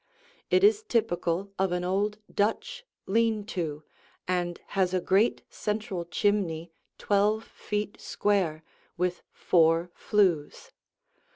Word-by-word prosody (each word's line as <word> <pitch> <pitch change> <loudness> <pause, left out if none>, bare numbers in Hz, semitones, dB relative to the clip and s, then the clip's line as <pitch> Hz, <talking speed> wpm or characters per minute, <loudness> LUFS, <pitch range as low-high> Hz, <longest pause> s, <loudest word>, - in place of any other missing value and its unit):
It 375 - +4
is 420 +1 +5
typical 195 - 0
of 190 -1 +2
an 180 0 -1
old 200 +3 0 0.2
Dutch 480 - -1 0.2
lean 220 0 +1
to 155 -4 -3 0.4
and 175 -1 -1
has 185 -2 +1
a - - +3
great 195 +6 +2
central 210 -4 -3
chimney 175 -3 0 0.3
twelve 210 +2 +2
feet 210 0 -4
square, 180 -7 0 0.3
with 180 0 -1
four 165 0 +3
flues. 180 -8 0
195 Hz, 110 wpm, -28 LUFS, 175-210 Hz, 0.4 s, is